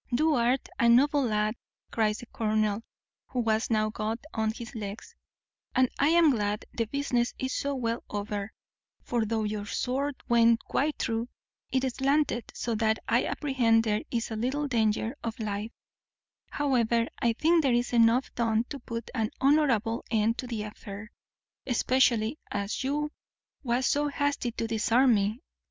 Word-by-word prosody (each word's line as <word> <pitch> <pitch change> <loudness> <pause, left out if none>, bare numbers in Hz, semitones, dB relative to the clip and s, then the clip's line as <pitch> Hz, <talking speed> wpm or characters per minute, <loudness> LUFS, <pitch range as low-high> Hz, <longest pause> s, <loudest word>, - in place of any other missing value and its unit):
"Thou 305 +6 +3
art 245 +1 +1
a 235 - +4
noble 285 +5 +5
lad," 215 -1 +1 0.4
cries 215 -2 +1
the - - -9
colonel, 215 -2 0 0.5
who 255 - -3
was 220 -1 +1
now 215 -1 +1
got 215 +1 -2 0.2
on 220 -1 0
his 235 +3 -9
legs, 215 - -7 0.6
"and 255 -1 +4
I 280 - +4
am 330 -1 +5
glad 210 -3 -1
the 230 - -1
business 245 -1 -1
is 260 0 -2
so 280 0 -1
well 235 -2 -2
over; 205 0 -4 0.5
for, 235 -2 0
though 220 0 -1
your 210 -1 -3
sword 270 +6 -1
went 230 -1 +4
quite 295 +2 -1
through, 230 +2 -2 0.4
it 265 0 +1
slanted 275 -2 0
so 235 - -2
that 220 0 +3
I - - +2
apprehend 240 -6 +2
there 215 -1 0
is 235 -1 -2
little 260 +7 -1
danger 225 0 0
of 225 -1 -4
life: 210 0 -3 0.8
however, 235 -5 +1
I 235 -1 +2
think 325 +7 +3
there 275 -4 +2
is 240 0 0
enough 235 +2 +4
done 225 -1 +1
to 280 - -6
put 230 -1 -6
an 220 -4 0
honourable 265 -6 +2
end 225 +1 +1
to 255 - -4
the 225 -3 -3
affair, 210 0 -9 0.6
especially 250 0 +2
as 200 +4 -3
you 295 +3 -1 0.5
was 250 -1 0
so 295 +1 +2
hasty 285 -3 -1
to 230 - -3
disarm 230 +3 +3
me. 210 +4 0
235 Hz, 160 wpm, -28 LUFS, 220-265 Hz, 0.8 s, noble